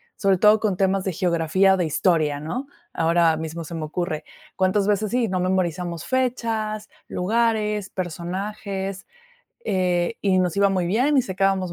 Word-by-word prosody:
sobre 195 -2 +2
todo 210 +2 +5
con 205 -5 0
temas 195 0 +1
de 190 - -1
geografía 180 +2 +2
o - - -3
de 175 - +1
historia, 155 -2 +1
¿no?, 245 - -4 0.3
ahora 165 0 +3
mismo 160 +1 -5
se 165 - -9
me 160 - -4
ocurre, 175 0 -3 0.3
cuántas 190 +2 +1
veces, 210 0 +1
sí, 245 -2 +1
nos 185 -1 -1
memorizamos 175 -2 -1
fechas, 225 -4 -1 0.2
lugares, 210 0 0
personajes, 190 +2 -4 0.6
eh, 180 +2 0
y 190 -2 +2
nos 180 0 0
iba 200 0 +4
muy 185 -3 0
bien 255 +10 +2
y 260 - +5
sacábamos 190 -2 0
190 Hz, 160 wpm, -23 LUFS, 175-210 Hz, 0.6 s, todo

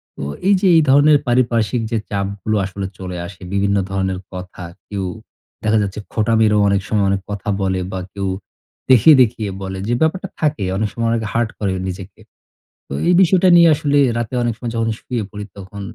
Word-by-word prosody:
তো - - -9 0.3
এই 200 - +6
যে 195 - +3
এই 160 - +6
ধরনের 145 +2 +6
পারিপার্শ্বিক 120 -1 +1
যে 115 - +1
চাপগুলো 100 +2 -2
আসলে 95 0 -5
চলে 90 -1 -6
আসে, 90 +1 -14
বিভিন্ন 100 0 +1
ধরনের 95 -1 -1
কথা। 90 0 -8 0.2
কেউ 100 -2 -4 0.6
দেখা 110 0 +2
যাচ্ছে 100 +1 -3
খোঁটা 115 +1 0
মেরেও 105 -1 +3
অনেক 100 -1 +1
সময় 105 -2 +1
অনেক 100 0 0
কথা 105 +1 -4
বলে 95 -1 0
বা 95 - -3
কেউ 100 -1 -3 0.6
দেখিয়ে, 130 +5 +7
দেখিয়ে, 110 -3 +1
বলে 95 0 -5
যে 120 - +1
ব্যাপারটা 180 +5 0
থাকে, 150 -8 0
অনেক 105 0 -1
সময় 115 -1 -1
অনেকে 110 -2 -1
হার্ট 115 -1 +1
করে 100 -3 -1 0.2
নিজেকে। 95 +1 -8 0.7
তো - - -8 0.2
এই 180 - +5
বিষয়টা 185 +1 +4
নিয়ে 170 -1 +7
আসলে 145 -1 +1 0.2
রাতে 120 +2 -4
অনেক 120 -1 0
সময় 120 -2 -5
যখন 115 0 0
শুয়ে 120 -4 -3
পড়ি 105 0 -7
তখন 100 +1 -9
105 Hz, 190 wpm, -19 LUFS, 100-120 Hz, 0.7 s, দেখিয়ে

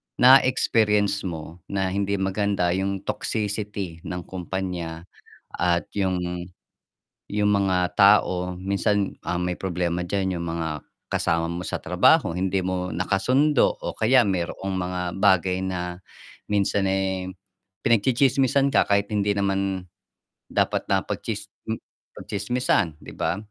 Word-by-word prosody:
na-experience 110 -6 +4
mo 80 0 -7
na 95 -1 -1
hindi 100 +1 0
maganda, 95 -2 0
yung 95 +1 -1
toxicity 100 -5 -3
ng 90 -1 -4
kompanya 90 -3 -5 0.5
at 85 -1 +1
yung 95 -2 +1 1.1
yung 105 0 +1
mga 95 -3 +1
tao, 90 -3 +4
minsan 100 +2 0 0.2
ang 85 +1 -1
may 90 0 -1
problema 90 -1 -1
diyan 95 -2 -1
yung 85 - -4
mga 80 -4 -3 0.3
kasama 85 0 0
mo 85 +1 -4
sa - - -3
trabaho, - - +4
hindi 95 +3 0
mo 90 0 -2
nakasundo 130 - +3
o - - -4
kaya 125 +3 +4
mayroong 95 0 -2
mga 90 0 -2 0.2
bagay 95 -2 +3
na 90 -1 -4 0.5
minsan, 100 -1 +1
eh, 95 -1 -1 0.6
pinagtsitsismisan 130 +4 +3
ka - - +5
kahit 100 0 +3
hindi 105 0 +1
naman 95 -2 -1 0.7
dapat - - 0
na - - +3
pagtsis - - -4 0.2
m - - 0 0.4
pagtsismisan, 105 -6 0
'di - - -10
ba? - - -1
95 Hz, 125 wpm, -24 LUFS, 90-100 Hz, 1.1 s, ka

